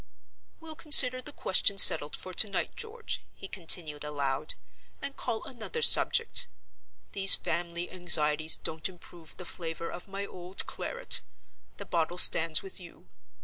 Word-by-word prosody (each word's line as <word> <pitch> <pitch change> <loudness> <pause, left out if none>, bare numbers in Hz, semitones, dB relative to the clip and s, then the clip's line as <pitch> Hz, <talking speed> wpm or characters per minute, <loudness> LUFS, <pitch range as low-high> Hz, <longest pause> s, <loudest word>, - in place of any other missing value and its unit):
—We'll 325 -1 -11
consider 255 -5 +5
the 295 - -8
question 200 -5 0
settled 150 -5 +5
for 185 - -10
to 210 +4 +3
night, - - -5
George," 455 0 -7
he 195 - -11
continued, 165 -5 -1
aloud, 145 0 -5 0.4
"and 275 0 -9
call 220 - -6
another 265 - -7
subject. 465 0 +3 0.6
These 195 -1 +7
family 170 +1 -6
anxieties 155 -3 +2
don't 160 +3 -4
improve 175 -3 -17
the 180 - -9
flavor 165 -1 -8
of 175 - -12
my 195 +1 -8
old 180 0 -6
claret. - - -2 0.6
The - - -11
bottle 170 0 -4
stands 160 -2 +4
with 195 - -10
you. 170 - -17
180 Hz, 145 wpm, -26 LUFS, 160-220 Hz, 0.6 s, These